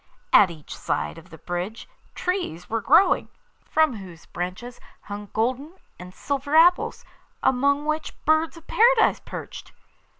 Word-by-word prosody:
At 200 -3 +7
each 160 -3 -10
side 75 0 -3
of - - -18
the 160 - -12
bridge 175 +7 -5 0.3
trees 360 - -3
were 225 0 -2
growing, 300 - +4 0.3
from 315 -7 +1
whose 180 -5 -12
branches 185 +8 -6 0.2
hung 205 0 -8
golden 255 +8 -1 0.3
and 180 0 -10
silver 280 +7 -3
apples, 345 +3 +4 0.4
among 280 +3 +2
which 310 +1 -2
birds 315 +2 +2
of 330 - -15
Paradise 470 +1 +4
perched. - - -9
250 Hz, 135 wpm, -24 LUFS, -, 0.4 s, At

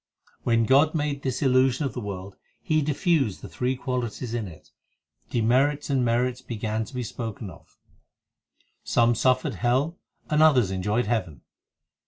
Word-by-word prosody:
7 - - -38
When 115 -1 +3
God 145 +6 +4
made 145 -2 -1
this 130 +1 -2
illusion 130 +1 +3
of 130 - -3
the 125 - -5
world, 100 -2 -6 0.2
He 155 -1 +1
diffused 145 - 0
the - - -6
three 125 +1 -2
qualities 125 -2 -4
in 115 -4 -2
it, 80 -3 -14 0.6
Demerits 135 +6 +1
and 130 -2 +2
merits 125 +2 0
began 110 -2 -3
to 130 - -12
be 125 - -2
spoken 110 -3 -6
of; - - -18 1.1
Some 120 0 +3
suffered 130 +3 +1
hell 130 - 0 0.3
and 150 0 +2
others 130 -11 +5
enjoyed 105 +6 0
heaven. 95 - -2
125 Hz, 155 wpm, -25 LUFS, 110-135 Hz, 1.1 s, others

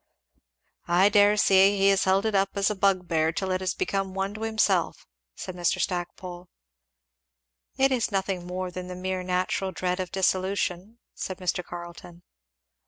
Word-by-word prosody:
"I 180 +4 +4
dare 205 0 +5
say 195 0 +5
he 195 0 +4
has 195 -1 +3
held 190 +2 +2
it 220 - 0
up 195 0 +2
as 200 +1 +1
a - - -3
bugbear 180 -5 +1
till 190 +3 -3
it 185 0 -1
has 185 - -1
become 195 -1 -2
one 195 +1 -2
to 215 - -9
himself," 215 -5 0 0.3
said 185 - -7
Mr. 175 -2 0
Stackpole. 175 0 -4 1.3
"It 270 0 +3
is 245 -4 0
nothing 190 -2 -2
more 180 0 -4
than 180 0 -7
the 180 - -7
mere 185 0 -3
natural 185 +1 -1
dread 180 +1 -2
of 185 -2 -4
dissolution," 190 +2 -1 0.2
said 185 - -5
Mr. 180 -1 -2
Carleton. 175 0 -10
185 Hz, 165 wpm, -26 LUFS, 180-195 Hz, 1.3 s, dare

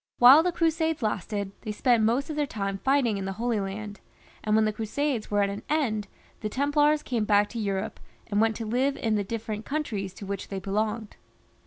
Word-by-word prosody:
While 260 +5 +9
the 360 +2 +1
Crusades 325 -3 0
lasted, 200 -1 -2
they 215 - -4
spent 230 +1 +3
most 250 +8 +1
of - - -4
their 295 -1 0
time 195 -4 -3
fighting 265 -6 +2
in 190 - -4
the 195 - -3
Holy 230 +1 -1
Land, 205 +1 -5 0.4
and 215 0 +2
when 220 0 +4
the 215 - 0
Crusades 230 +3 -2
were 205 -1 +2
at 200 - 0
an 200 - -5
end 230 -9 0 0.3
the 215 - -3
Templars 295 +4 +2
came 235 -4 -1
back 205 -1 +3
to 235 - -5
Europe, 200 0 -2 0.3
and 205 0 +1
went 225 0 +2
to 225 - -4
live 255 +5 +1
in 225 -2 0
the 205 -1 +1
different 220 +1 -4
countries 215 -11 -3
to 200 - -8
which 200 0 -4
they 195 - -5
belonged. 210 +3 -2
220 Hz, 210 wpm, -27 LUFS, 205-265 Hz, 0.4 s, While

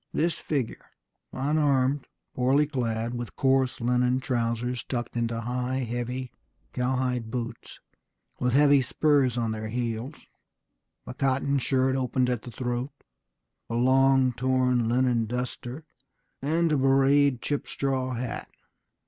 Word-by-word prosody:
This 165 +1 +1
figure, 140 -6 -3 0.5
unarmed, 140 -1 +1 0.3
poorly 135 +4 +3
clad, 120 -5 -2
with 120 -1 -6
coarse 130 -1 +2
linen 125 +1 +2
trousers 120 -1 -1
tucked 120 -2 -4
into 115 -1 -1
high, 125 +2 -2
heavy 120 +2 -4 0.4
cowhide 125 -2 -1
boots, 120 0 -6 0.6
with 125 -1 +1
heavy 145 0 +6
spurs 135 -2 +2
on 115 -2 0
their 110 0 -4
heels, 120 +4 -3 0.9
a - - -7
cotton 135 +1 +1
shirt 130 0 +1
opened 130 -1 +1
at 120 -3 -2
the - - -9
throat, 125 +2 -3 0.8
a 115 - -2
long 130 +1 +4
torn 125 -1 +1
linen 120 -2 +2
duster, 125 +4 -5 0.6
and 165 +4 +1
a 150 - +3
bewrayed 135 0 +4
chip 145 +3 -3
straw 130 -2 -1
hat 120 0 -4
130 Hz, 125 wpm, -27 LUFS, 120-135 Hz, 0.9 s, heavy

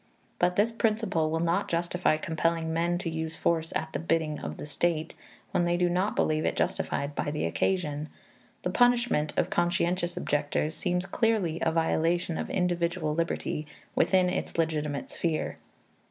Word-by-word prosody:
But 180 0 +3
this 210 +4 +3
principle 215 -8 +1
will 160 +1 0
not 170 +1 +1
justify 170 -1 +1
compelling 160 0 0
men 170 +1 +1
to 175 - -4
use 160 0 -3
force 165 -1 +1
at 160 - -2
the - - -1
bidding 160 -2 0
of - - -5
the - - -6
state, 160 +1 -1 0.4
when - - +2
they 175 0 +2
do 180 0 +2
not 185 +4 +1
believe 155 0 +1
it - - 0
justified 140 +1 -1
by 145 - -2
the 150 +1 -1
occasion. 150 - -1 0.5
The - - 0
punishment 240 -11 +3
of - - +1
conscientious 175 0 +1
objectors 150 +1 0
seems 180 +2 -1
clearly 195 -6 +1
a 160 - +2
violation 165 +1 +1
of - - -3
individual 175 -3 0
liberty 155 -2 -2 0.3
within 185 -1 +4
its 180 - -2
legitimate 150 -3 -1
sphere. 165 -2 -1
170 Hz, 160 wpm, -28 LUFS, 155-180 Hz, 0.5 s, within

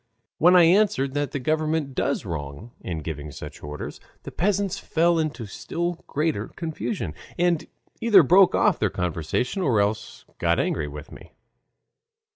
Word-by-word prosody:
When 175 +3 +6
I 180 - +8
answered 165 -7 +3
that 145 -1 -1
the - - -4
government 155 +1 -1
does 140 -2 -1
wrong 80 +5 -6
in 80 -4 -5
giving 75 -1 -5
such 70 - -9
orders, 75 0 -7 0.2
the - - -8
peasants 195 +1 0
fell 170 +1 +2
into 150 -7 -2
still 170 - -4
greater 150 -8 -1
confusion, 165 +5 -4 0.2
and 175 -2 +1 0.3
either 215 -6 +6
broke 185 +6 +5
off - - +3
the - - +2
conversation 90 - -2
or 125 - +2
else 105 +1 -2
got 85 0 +2
angry 75 -3 -1
with 75 0 -9
me. - - -13
145 Hz, 150 wpm, -24 LUFS, -, 0.3 s, I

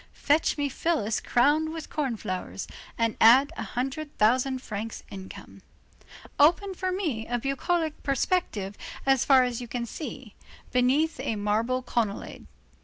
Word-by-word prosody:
Fetch 300 +2 +1
me 290 -1 0
Phyllis 275 -6 0
crowned 295 +6 +2
with 320 -1 -7
corn 270 -7 -1
flowers, 185 0 -5 0.3
and 230 -1 +1
add 265 +7 +7
a - - -5
hundred 275 +4 -4
thousand 255 +4 +2
francs 215 +1 -5
income. 190 -1 -10 0.8
Open 350 +7 +4
for 370 0 -2
me 310 - -2
a 245 - 0
bucolic 310 +5 -1
perspective 260 - -1 0.3
as 270 -2 +4
far 265 -2 +6
as 245 -1 -2
you 240 - -6
can 235 0 -3
see, 250 -3 -7 0.4
beneath 270 +6 +2
a 225 - -2
marble 220 +5 0
colonnade. 225 -5 -3
255 Hz, 140 wpm, -27 LUFS, 225-305 Hz, 0.8 s, add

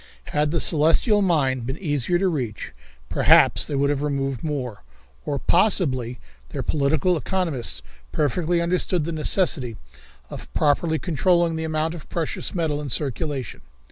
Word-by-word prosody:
Had 150 0 +2
the 165 +2 0
celestial 165 - +3
mine 145 -9 +2
been 130 +4 -5
easier 150 -1 0
to 190 +2 +1
reach, 125 - -3 0.3
perhaps - - +4
they 145 - -3
would 140 +1 +2
have 145 -1 -1
removed 135 -4 -2
more, 135 -8 -4 0.4
or, 145 - -1
possibly, 135 - +2 0.3
their - - -4
political 155 +4 +1
economists 160 - -2 0.3
perfectly 170 +4 0
understood 175 0 0
the 170 - -3
necessity 150 - 0 0.5
of - - -9
properly 160 +2 +2
controlling 170 0 +1
the 160 0 -3
amount 160 +1 -1
of 165 -4 -10
precious 165 +2 -3
metal 155 -4 -1
in 145 - -5
circulation. 140 -1 -2
150 Hz, 140 wpm, -23 LUFS, 140-170 Hz, 0.5 s, perhaps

